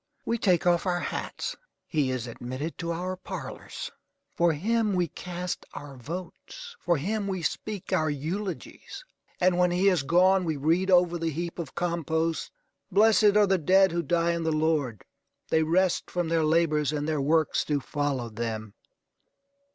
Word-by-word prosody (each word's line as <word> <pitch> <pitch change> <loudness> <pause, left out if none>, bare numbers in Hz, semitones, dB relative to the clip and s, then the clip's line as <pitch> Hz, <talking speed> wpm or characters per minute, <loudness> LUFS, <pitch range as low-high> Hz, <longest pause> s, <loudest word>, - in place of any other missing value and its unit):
We 230 0 0
take 180 -7 +2
off 175 +1 +3
our 175 -1 +1
hats. - - -4 0.3
He 150 -5 0
is 130 -2 -2
admitted 130 +6 -5
to 170 0 -2
our 180 +2 -3
parlors. 185 -6 -7 0.4
For 170 0 +3
him 215 +5 +1
we 175 -1 +1
cast 180 +2 -5
our 145 -1 -8
votes. 185 - -8
For 170 - +1
him 200 +7 -2
we 190 -3 -3
speak 205 +3 -3
our 155 0 +2
eulogies. 180 - -5 0.3
And 180 -1 +3
when 180 0 +4
he 180 +2 +1
has 175 - +1
gone 185 +6 +4
we 160 -3 -1
read 165 +7 +1
over 175 -2 +4
the 165 0 0
heap 170 +3 -4
of 160 -5 -6
compost: 165 -1 -1 0.4
"Blessed 210 +1 +5
are 210 - +6
the 190 -1 +2
dead 190 +4 +4
who 170 0 0
die 170 +1 +1
in 170 0 -1
the 160 0 0
Lord. 155 -8 0 0.5
They 160 - +3
rest 175 +3 +1
from 175 -2 -1
their 165 -1 +2
labors 155 -2 +2
and 150 -1 -2
their 155 -3 0
works 155 +2 +2
do 145 -1 0
follow 140 -4 -2
them." 110 -2 -4
170 Hz, 165 wpm, -27 LUFS, 150-185 Hz, 0.5 s, are